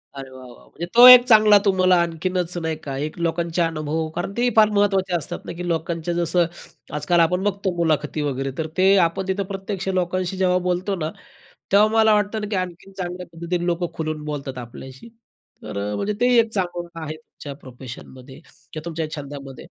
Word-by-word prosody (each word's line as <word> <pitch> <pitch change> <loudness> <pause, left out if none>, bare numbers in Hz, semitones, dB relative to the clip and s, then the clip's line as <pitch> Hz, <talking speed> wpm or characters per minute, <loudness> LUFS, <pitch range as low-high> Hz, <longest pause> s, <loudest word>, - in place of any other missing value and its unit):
अरे, 135 -1 -8
वाह, 130 -1 -12
वाह! 120 - -16
म्हणजे 170 - -7
तो 240 +1 +10
एक 250 -1 +11
चांगला 215 -3 +7
तुम्हाला 185 -2 +4
आणखीनच 175 +1 -2
नाही 160 -2 -2
का, 135 -2 -5
एक 150 +4 -4
लोकांचे 170 0 -1
अनुभव, 160 -1 -1
कारण 175 +3 -3
ते 245 +1 +2
फार 215 -1 +6
महत्त्वाचे 195 -3 +1
असतात 160 -4 -3
ना, - - -6
की 175 +1 -6
लोकांच्या, 165 0 -2
जसं 175 0 +1 0.5
आजकाल 150 +4 +1
आपण 180 +3 +2
बघतो 200 -1 -1
मुलाखती 155 -2 0
वगैरे, 135 -2 -2
तर 160 - -2
ते 190 +1 +5
आपण 185 +3 -6
तिथं 190 +1 -1
प्रत्यक्ष 195 0 -5
लोकांशी 185 +1 -1
जेव्हा 180 -1 +2
बोलतो 180 +2 -1
ना, 155 -4 -3 0.6
तेव्हा 205 +2 +6
मला 220 -1 +5
वाटतं 210 +1 0
ना, 210 - -4
की 210 - -2
आणखीन 185 +1 -5
चांगल्या 180 -1 -5
पद्धतीने 170 +1 -3
लोकं 175 0 -1
खुलून 155 -1 -4
बोलतात 140 -3 -5
आपल्याशी. 130 - -10 0.5
तर, - - -7
अ, - - -3
म्हणजे 205 - -2
ते 250 +1 +4
एक 225 -1 +1
चांगलं 175 -3 -3
आहे 155 0 -5
तुमच्या 155 -2 -11
प्रोफेशनमध्ये 130 0 -11
किंवा 155 -1 -12
तुमच्या 165 -2 -4
छंदामध्ये. 140 -2 -9
175 Hz, 185 wpm, -22 LUFS, 155-190 Hz, 0.6 s, एक